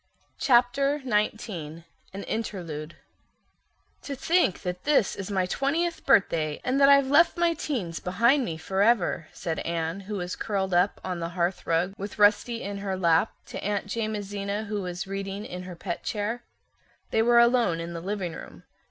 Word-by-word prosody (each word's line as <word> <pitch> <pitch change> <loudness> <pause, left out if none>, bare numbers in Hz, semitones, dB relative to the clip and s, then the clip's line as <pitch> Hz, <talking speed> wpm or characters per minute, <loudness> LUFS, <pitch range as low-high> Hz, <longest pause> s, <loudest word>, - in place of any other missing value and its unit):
Chapter 275 +3 +3
XIX 210 - -2 0.3
An 195 +1 -6
Interlude 170 -8 -4 1.1
"To 280 - -5
think 330 - +1
that 180 0 -4
this 290 -8 +2
is 195 0 -6
my 190 -2 +1
twentieth 320 - -1
birthday, 160 - +3
and 265 +2 +1
that 275 - +7
I've 280 -1 +6
left 305 +7 +4
my 340 -1 +3
teens 225 - -3
behind 235 +10 +3
me 165 -8 -4
forever," 190 -1 +1
said 165 -3 -4
Anne, 165 +2 -2
who 200 +2 -6
was 180 -2 -3
curled 190 -3 -2
up 180 +3 +2
on 180 -2 -3
the 165 0 -3
hearth 175 +1 -1
rug 170 +3 +1
with 200 +1 -6
Rusty 210 +3 +3
in 200 0 -4
her 195 -1 -3
lap, 170 +2 +3
to - - -7
Aunt 205 0 -1
Jamesina 205 -2 -3
who 210 -1 -3
was 180 +1 -4
reading 195 +1 -5
in 180 -3 -6
her 180 - -7
pet 170 0 -5
chair. 220 +3 -3 0.7
They 220 - +3
were 240 +1 +4
alone 235 -8 +4
in 170 +1 -5
the 165 - -5
living 190 -2 -3
room. - - -10
200 Hz, 170 wpm, -27 LUFS, 180-235 Hz, 1.1 s, that